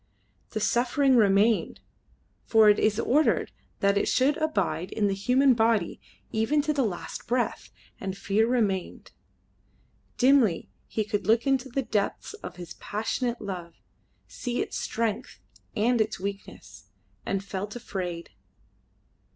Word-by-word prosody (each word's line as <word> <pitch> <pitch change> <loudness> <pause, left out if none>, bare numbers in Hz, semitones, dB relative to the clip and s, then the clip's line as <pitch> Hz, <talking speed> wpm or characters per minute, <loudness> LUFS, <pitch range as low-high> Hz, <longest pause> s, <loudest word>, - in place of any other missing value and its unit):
The 215 - -3
suffering 255 +5 +2
remained, 210 0 +3 0.7
for 220 -2 +6
it 205 - +4
is 215 0 +2
ordered 295 +6 +2 0.3
that 200 0 +3
it - - -1
should 270 +3 +3
abide 195 - -1
in 215 - 0
the 200 - +2
human 250 +7 +3
body 225 -5 +1 0.3
even 225 +7 +1
to 305 0 0
the 285 - +1
last 205 -8 -4
breath, 245 0 -1 0.3
and 195 -1 -4
fear 205 +3 +1
remained. 210 -7 -1 1.1
Dimly 255 -9 +3 0.2
he 220 - -1
could 205 -2 -3
look 225 +2 +3
into 270 -1 +1
the 270 +2 -1
depths 210 - -2
of 425 - -9
his 175 -2 -9
passionate 235 +3 -2
love, 180 -5 -6 0.5
see 245 -1 -4
its - - -3
strength 230 +1 -3 0.4
and 235 +2 +2
its 215 -3 -1
weakness, 200 +1 -7 0.4
and 195 0 -2
felt 200 +2 -5
afraid. 180 -7 -5
220 Hz, 135 wpm, -27 LUFS, 200-245 Hz, 1.1 s, for